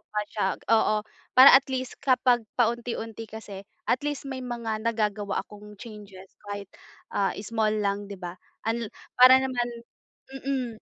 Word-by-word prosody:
pa 210 - -1
siya 205 -1 -2 0.2
oo, 220 -1 +3 0.4
para 260 +2 +11
at 270 0 +6
least 260 -1 -4
kapag 250 -2 +3 0.2
paunti-unti 230 -2 -2
kasi, 210 -3 -8 0.2
at 250 - +1
least 290 -1 -3
may 265 -1 -5
mga 235 -3 -4
nagagawa 210 -3 -1
akong 210 0 -13
changes 200 -3 -12 0.2
kahit, 200 -1 -6 0.4
ah, 195 -1 0
small 215 0 0
lang, 200 0 -1
'di 200 - -7
ba? 175 -2 -6 0.3
Unl 225 0 -1 0.2
para 255 +1 +8
naman 255 -2 0 0.7
mm, 260 -3 -2
225 Hz, 145 wpm, -26 LUFS, 210-250 Hz, 0.7 s, para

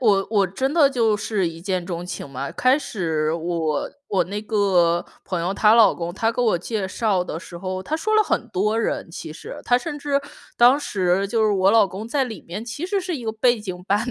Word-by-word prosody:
我 200 -5 +3
我 200 -3 +3
真 260 +10 -2
的 300 -5 +6
就 230 -5 +2
是 205 -3 -1
一 165 0 -9
见 185 -2 -1
钟 175 -1 -4
情 180 - -6
嘛。 135 +1 -5
开 255 +3 +3
始 160 - -1
我 165 -2 -1 0.2
我 195 - +2
那 205 +3 -4
个 185 -6 +2 0.2
朋 180 -3 -2
友 180 +4 -1
她 210 +1 +5
老 230 -2 +6
公， 170 0 -4
他 225 +4 0
给 245 - -2
我 220 -7 +2
介 200 +2 -3
绍 195 -2 0
的 165 -2 -5
时 175 - -10
候， 185 +1 -4
他 310 +10 -2
说 435 +7 -1
了 430 - +6
很 245 - -1
多 210 +2 0
人 225 - -2
其 155 - -7
实， - - -9
他 245 0 +3
甚 295 +1 -5
至 280 -1 0 0.4
当 245 +4 +6
时 190 -6 0
就 225 0 +1
是 215 - +3
我 190 0 +3
老 220 -2 +5
公 195 +4 -7
在 275 +2 +1
里 225 -4 -8
面 185 +6 -7
其 240 +8 -5
实 390 +1 0
是 360 -3 -3
一 245 - -8
个 220 - -1
背 240 +1 +2
景 185 -3 -6
板 210 +5 +1
205 Hz, 250 characters per minute, -22 LUFS, 180-240 Hz, 0.4 s, 的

